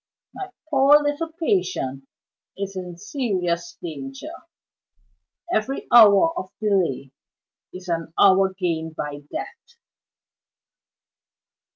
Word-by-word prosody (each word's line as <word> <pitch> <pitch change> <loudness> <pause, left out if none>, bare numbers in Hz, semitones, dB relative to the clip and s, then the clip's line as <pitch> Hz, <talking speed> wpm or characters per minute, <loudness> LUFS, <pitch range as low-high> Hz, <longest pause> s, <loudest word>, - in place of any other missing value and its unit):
My 385 - -7 0.2
poor 280 +1 +6
little 295 +3 -2
patient 320 - -1 0.5
is 195 0 -5
in 180 -2 -6
serious 180 - -2
danger 135 -5 -7 1.2
every 255 +6 -1
hour 230 +7 +7
of 185 - -7
delay 180 -11 0 0.6
is 185 0 -10
an 165 -2 -2
hour 195 -1 +5
gained 165 -4 -3
by 145 -1 -5
death. 470 0 -8
190 Hz, 90 wpm, -23 LUFS, 165-270 Hz, 1.2 s, hour